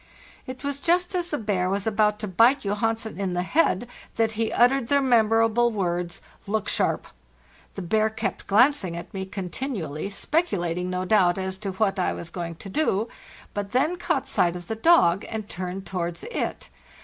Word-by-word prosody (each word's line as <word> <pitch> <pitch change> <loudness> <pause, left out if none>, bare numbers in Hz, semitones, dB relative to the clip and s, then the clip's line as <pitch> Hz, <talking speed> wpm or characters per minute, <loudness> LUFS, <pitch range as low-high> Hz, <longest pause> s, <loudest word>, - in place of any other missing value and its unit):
It 255 +1 -8
was 280 0 -2
just 355 +4 +2
as 355 -2 0
the 300 - -2
bear 195 -6 0
was 195 +1 -1
about 210 -1 +2
to 210 - -3
bite 230 +9 +4
Johansen 220 +2 -2
in 190 -2 -1
the 180 0 0
head 245 - +1 0.3
that 225 -1 +2
he 225 +1 -1
uttered 245 0 +3
the 280 +2 +3
memorable 225 -2 +3
words, 175 -4 -2
" - - -29
Look 215 0 -1
sharp!" - - +1 0.7
The 195 - -5
bear 215 +5 +2
kept 220 - -4
glancing 210 -5 +3
at 170 - -9
me 190 -1 -4
con 190 -2 -5
tinually, 195 - -4
speculating, 180 - -1
no 185 0 -2
doubt, 185 -3 +3
as 190 0 -3
to 195 -2 -4
what 195 0 0
I 180 - +1
was 170 - -8
going 170 -2 -5
to 180 - -10
do; 225 -4 0 0.4
but 205 0 -4
then 305 +8 +2
caught 350 - -1
sight 175 0 +1
of 175 -1 -7
the 225 - -2
dog 210 - +4
and 220 -2 -4
turned 185 +1 -5
towards 175 -2 -4
it. 480 - -4
210 Hz, 185 wpm, -25 LUFS, 185-240 Hz, 0.7 s, bite